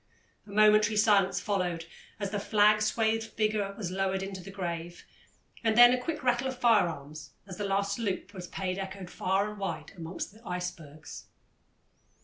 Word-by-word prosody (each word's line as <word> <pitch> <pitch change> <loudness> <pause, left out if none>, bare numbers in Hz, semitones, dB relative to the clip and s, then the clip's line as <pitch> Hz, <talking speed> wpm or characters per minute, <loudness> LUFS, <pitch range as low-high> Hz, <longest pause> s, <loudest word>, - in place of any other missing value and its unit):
A - - -15
momentary 215 +1 +4
silence 205 -3 +4
followed 180 -5 -2 0.3
as 200 -2 -3
the 205 - -1
flag 210 +1 +4
swathed 220 +1 +1
figure 215 -2 -1
was 190 -6 -4
lowered 190 0 -1
into 195 -1 -6
the 180 - -10
grave, 175 -3 -5 0.6
and 225 -1 +2
then 245 +1 +9
a 250 - 0
quick 310 +2 -4
rattle 245 +1 +2
of 260 -1 -4
firearms 165 - +1
as 185 -3 -9
the 205 - -3
last 200 +1 0
salute 205 -2 -3
was 180 -3 -7
paid 185 +1 -3
echoed 190 -1 -6
far 195 +2 0
and 210 -1 -8
wide 165 -6 -4
among 170 0 -8
the 215 +2 -6
icebergs. 180 -6 -7
200 Hz, 165 wpm, -29 LUFS, 180-215 Hz, 0.6 s, then